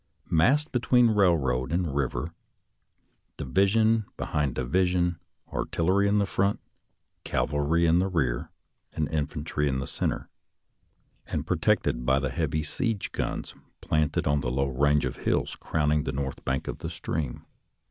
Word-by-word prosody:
Massed 135 - +3
be 125 - +1
tween 120 -1 +4
railroad 75 -11 +2
and 85 -4 0
river, 70 +4 -2 1.0
division 110 - +2
behind 75 -4 -1
divi 75 +9 +1
sion, 90 -1 0 0.3
artillery 95 +4 +1
in 100 0 +3
front, 100 +1 0 0.6
cavalry 75 +4 +1
in 85 +1 +4
rear, 80 -11 0 0.4
and 75 -2 -1
in 75 -2 0
fantry 75 -1 -2
in 65 -2 0
the 70 - -3
center, - - -2 1.0
and - - -3
protected - - +1
by 65 +2 +3
the 70 -2 -2
heavy 80 -2 -1
siege 115 - -2
guns - - -3 0.3
planted 75 -1 0
on 70 0 +2
the 60 - -2
low 70 +2 0
range 75 +3 +2
of - - -4
hills - - 0
crowning 75 -1 0
the 65 - -2
north 70 -1 -4
bank 65 0 -2
of - - -4
the - - -4
stream. 75 -6 -4
80 Hz, 145 wpm, -27 LUFS, 70-95 Hz, 1.0 s, tween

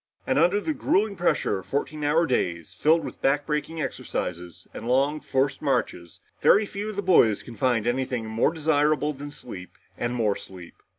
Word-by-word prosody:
And - - +1
under 180 +5 +4
the 310 +9 -2
grueling 210 -6 +1
pressure 170 - +1
of 95 - -13
fourteen 150 +2 -3
hour 155 +3 +3
days, 85 - -1
filled 160 +2 +2
with - - -8
backbreaking 150 +3 0
exercises 90 -1 -5
and - - -7
long 140 +4 +2
forced 135 -1 -1
marches, 120 - -2 0.2
very 210 - +5
few 205 +1 -5
of 215 - -6
the 200 - -2
boys 120 - +4
can 120 - -10
find 120 -4 +1
anything 125 -1 -1
more 110 +6 +1
desirable 150 -1 +1
than 145 +1 -8
sleep 120 - -10 0.3
and 120 +1 -1
more 110 -4 +1
sleep. 90 -3 -11
140 Hz, 175 wpm, -25 LUFS, 115-160 Hz, 0.3 s, very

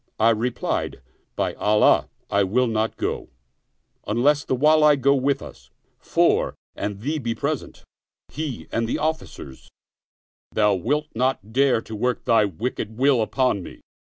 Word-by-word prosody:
I 115 +1 +5
replied, 115 +2 -2 0.2
" - - -44
By - - -1
Allah 105 0 +3 0.2
I 100 0 +3
will 120 +7 +2
not 110 -1 -1
go, - - -3 0.8
unless 140 +7 +2
the - - -1
Wali 150 +2 +5
go 140 +1 +3
with 140 +1 0
us; - - -13 0.3
for, - - +1 0.2
an 100 -1 -4
he 150 +6 -2
be 115 -3 -3
present, 145 -1 -4 0.5
he 150 -5 -5
and 115 0 -1
the - - 0
officers, 70 - -5 0.8
thou 105 -1 +3
wilt 140 - 0
not 115 -3 -1
dare 130 -3 +3
to 110 - -8
work 125 +4 -1
thy 115 -3 +4
wicked 110 +3 -4
will 135 -2 +3
upon 125 -2 +1
me." - - -11
120 Hz, 150 wpm, -23 LUFS, 110-140 Hz, 0.8 s, I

